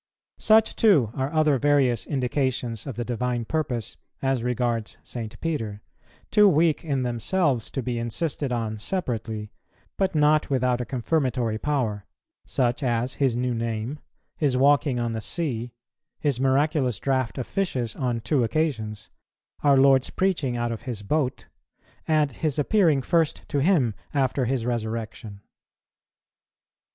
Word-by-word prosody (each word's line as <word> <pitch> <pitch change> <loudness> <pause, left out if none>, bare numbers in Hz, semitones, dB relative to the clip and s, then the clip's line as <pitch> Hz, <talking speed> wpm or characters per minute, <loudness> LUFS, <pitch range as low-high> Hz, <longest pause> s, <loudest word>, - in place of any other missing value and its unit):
Such, 220 0 +4
too, 155 - +4
are 130 +2 -2 0.3
various 135 -6 +2
other - - -10
indications 130 -3 -1
of 135 - -5
the 120 - -3
Divine 120 0 -2
purpose 125 -6 -2 0.2
as 135 -2 0
regards 120 -2 -1
St. 115 -1 -7
Peter, 110 -11 -3 0.5
too 210 -1 +6
weak 160 -2 +2
in 140 -5 -1
themselves 125 - 0
to 135 - -4
be 120 -1 -2
insisted 135 +4 -2
on 110 -3 -2
separately, 110 - -3 0.5
but 190 -4 0
not 150 0 +3
without 125 -2 +1
a - - -3
confirmatory 125 -3 -1
power; 115 -9 -1 0.4
such 120 -2 0
as 125 -1 0
his 130 -4 +2
new 125 0 0
name, 115 +4 -3 0.4
his 140 -5 +1
walking 140 -1 +3
on 120 -1 -1
the 110 -1 -3
sea, 125 -6 -3 0.5
his 140 -5 +1
miraculous 135 - +2
draught 130 -1 -1
of 130 - -2
fishes 130 - -2
on 120 -3 -1
two 135 +1 +1
occasions, 110 -7 -2 0.5
our 140 -2 +5
Lord's 135 -1 +5
preaching 160 -10 0
out 120 0 -1
of 115 - -5
his 110 -4 -4
boat, 130 +3 -1 0.6
and 155 -3 +2
His 155 +3 -2
appearing 155 -3 +3
first 165 +2 +1
to 145 - 0
him 140 - +3 0.2
after 135 -1 +1
His 125 -1 -1
resurrection. 110 -3 -4
130 Hz, 140 wpm, -25 LUFS, 115-145 Hz, 0.6 s, too